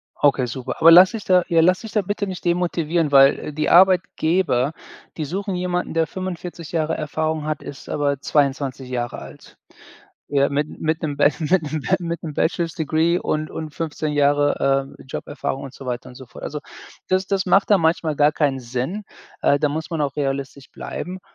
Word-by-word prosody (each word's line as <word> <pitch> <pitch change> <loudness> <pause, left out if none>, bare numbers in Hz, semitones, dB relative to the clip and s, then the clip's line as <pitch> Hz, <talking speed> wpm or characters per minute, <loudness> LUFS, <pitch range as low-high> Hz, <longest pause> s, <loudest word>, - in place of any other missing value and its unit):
Okay, 135 -3 +2
super. 125 +1 -5
Aber 165 - +8
lass 180 +3 +9
dich 220 -3 -6
da 180 -1 +4
ja, 165 -1 +4
lass 185 +2 +3
dich 225 - -8
da 210 - +1
bitte 205 +2 -3
nicht 185 -3 -7
demotivieren, 170 -3 0
weil, 135 0 +6
äh, 150 - -7
die 155 +1 -1
Arbeitgeber, 175 -6 +3 0.4
die 155 - -3
suchen 195 +6 -3
jemanden, 180 0 -2
der 165 -1 +1
45 175 -2 -6
Jahre 160 -1 0
Erfahrung 155 0 -2
hat, 155 -1 -3
ist 140 - -10
aber 140 -2 0
22 135 -3 0
Jahre 120 -1 -3
alt. 70 -1 -13 0.7
Ja, 140 -1 +3
mit 145 +1 0
mit 160 +1 -1
'nem 150 -3 -2
Ba 145 - +6
mit 165 +3 +2
'nem 155 -1 -2
Ba 185 - +2
mit 170 -1 -4
'nem 155 - -5
Bachelor's 165 +2 0
Degree 160 +2 +1
und 155 -3 -2
und 155 -2 -6
15 155 -1 -3
Jahre, 145 -1 +2
äh, - - -14
Joberfahrung 140 0 -5
und 135 -2 -9
so 135 - -11
weiter 125 -1 -4
und 125 - -13
so 130 - -11
fort. - - -13
Also, 150 - -4 0.5
das 185 +1 +1
das 195 -1 0
macht 195 +2 +3
da 205 - +6
manchmal 160 -2 +1
gar 145 +1 +4
keinen 145 -3 0
Sinn. 130 - -4 0.4
Äh, 140 - +3
da 150 - +2
muss 155 +2 -4
man 165 -3 -2
auch 140 -2 -2
realistisch 140 -1 -3
bleiben. 185 +3 -6
155 Hz, 195 wpm, -21 LUFS, 140-175 Hz, 0.7 s, lass